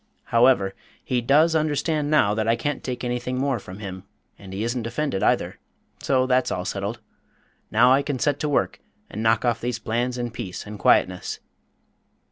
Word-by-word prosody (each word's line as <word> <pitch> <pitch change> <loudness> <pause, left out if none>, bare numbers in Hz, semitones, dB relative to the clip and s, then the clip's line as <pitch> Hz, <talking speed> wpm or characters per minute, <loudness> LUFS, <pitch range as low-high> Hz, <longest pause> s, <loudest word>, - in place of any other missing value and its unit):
However, 115 -5 +4 0.3
he 125 -2 0
does 150 +7 +4
understand 155 -1 0
now 105 -10 +4
that 110 +1 -1
I 115 - +4
can't 145 +4 -3
take 125 -1 -4
anything 125 +1 -2
more 135 -2 0
from 95 -1 -10
him, 95 -3 -7 0.4
and 95 -2 -11
he 100 +3 -3
isn't 120 0 -2
offended 130 -4 -2
either, - - +1 0.4
so 130 -1 +2
that's 130 0 +2
all 90 0 -3
settled. 100 +4 -3 0.7
Now 125 +4 +5
I 135 - +4
can 140 -1 -3
set 145 +2 0
to 150 - -1
work 145 - 0 0.3
and 110 - -5
knock 115 +1 +2
off 115 -1 +1
these 120 0 -2
plans 120 +2 -2
in 120 -1 -3
peace 110 -6 -6
and 105 0 -8
quietness." 90 -1 +2
120 Hz, 180 wpm, -24 LUFS, 110-135 Hz, 0.7 s, Now